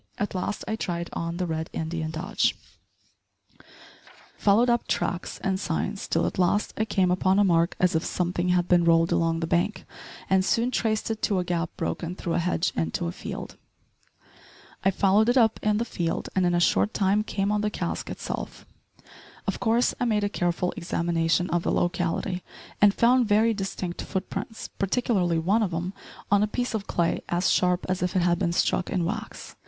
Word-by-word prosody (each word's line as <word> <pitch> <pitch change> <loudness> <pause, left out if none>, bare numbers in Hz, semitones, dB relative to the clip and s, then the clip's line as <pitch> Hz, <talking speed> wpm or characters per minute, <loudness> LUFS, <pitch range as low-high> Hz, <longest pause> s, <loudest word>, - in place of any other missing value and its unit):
At 205 - -2
last 185 +2 -3
I 220 - -1
tried 170 -5 -4
on 170 0 -3
the 180 - -1
Red 160 -1 -3
Indian 160 0 -3
dodge 180 +7 0 1.8
followed 215 +4 +3
up 240 -1 +1
tracks 175 - -2
and 190 -1 0
signs, 195 +2 -2
till 165 - +1
at - - -3
last 185 +3 +2
I 220 - 0
came 190 -4 +1
upon 185 +1 +2
a 205 - +5
mark 170 -3 +2
as 180 -1 +3
if 160 0 +1
somethin' 180 0 -1
had 180 -1 +2
bin 175 -1 +4
rolled 165 0 +4
along 165 0 +1
the - - 0
bank, 175 +6 0 0.4
and 190 0 +3
soon 235 +5 +1
traced 220 -2 0
it 220 - -4
to 200 - +1
a 180 - +1
gap 175 -1 -1
broken 175 +1 -3
through 170 -3 -3
a - - +1
hedge 170 -1 0
into 80 +1 -1
a 85 - -2
field. - - -7 1.3
I 190 - +4
followed 200 +3 +3
it 245 - +3
up 225 -3 +4
in 210 0 +2
the 230 - 0
field, 170 -7 -3
and 185 -2 +3
in 175 - +2
a - - +3
short 100 - +2
time 200 +2 +2
came 200 -1 -1
on 210 0 +1
the 210 - 0
cask - - -4
itself. - - -6 0.8
Of - - -2
course 235 +1 +2
I - - +1
made 215 -3 +1
a 205 - +1
careful 175 -1 -1
examination 170 -1 0
of 175 0 +1
the - - -1
locality, 175 +1 -1 0.4
and 205 0 +7
found 240 +3 +3
very 220 +2 +4
distinct 190 -3 -4
foot 190 -1 -4
prints, 225 - -5
particularly 195 -5 0
one 195 +8 +2
of 200 -4 0
'em 175 +3 -3 0.4
on 205 0 +5
a 210 - +2
piece 245 +3 -2
of 210 -3 -3
clay 170 -1 0
as 175 +2 +2
sharp 180 0 +2
as 185 0 -1
if 180 +1 -1
it 180 - +3
had 175 -1 +2
been 175 -3 +1
struck 175 - +1
in 180 -3 0
wax. 220 +5 -5
185 Hz, 195 wpm, -26 LUFS, 170-210 Hz, 1.8 s, and